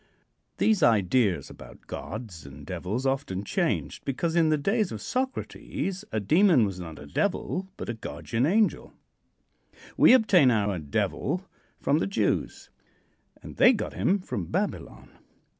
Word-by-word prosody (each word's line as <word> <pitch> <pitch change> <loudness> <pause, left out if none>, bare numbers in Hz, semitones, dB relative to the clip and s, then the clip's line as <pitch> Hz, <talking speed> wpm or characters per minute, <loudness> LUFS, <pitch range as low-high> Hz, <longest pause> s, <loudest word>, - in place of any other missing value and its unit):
These 220 -3 +2
ideas 105 -2 +2
about 65 +1 -14
gods 110 -6 -7
and 70 -1 -12
devils 110 +9 -4
often 135 -8 -1
changed, - - -2
because 160 +5 -2
in 165 -2 +4
the 155 - +3
days 200 +6 0
of 110 - -5
Socrates 215 - -3
a 110 - 0
demon 155 - +4
was 95 -2 -5
not 80 -3 -8
a 75 - -10
devil, 190 - -2
but - - -6
a 120 - -2
guardian 115 +2 -2
angel. 210 +5 +1 1.0
We - - +7
obtain 195 - +5
our 105 -5 +1
Devil 75 -2 -2 0.3
from 150 - +1
the - - -1
Jews, 195 - -1 0.7
and - - -10
they 250 - +7
got 220 - -4
him 195 - +1
from 105 - -5
Babylon. - - -4
130 Hz, 140 wpm, -27 LUFS, -, 1.0 s, We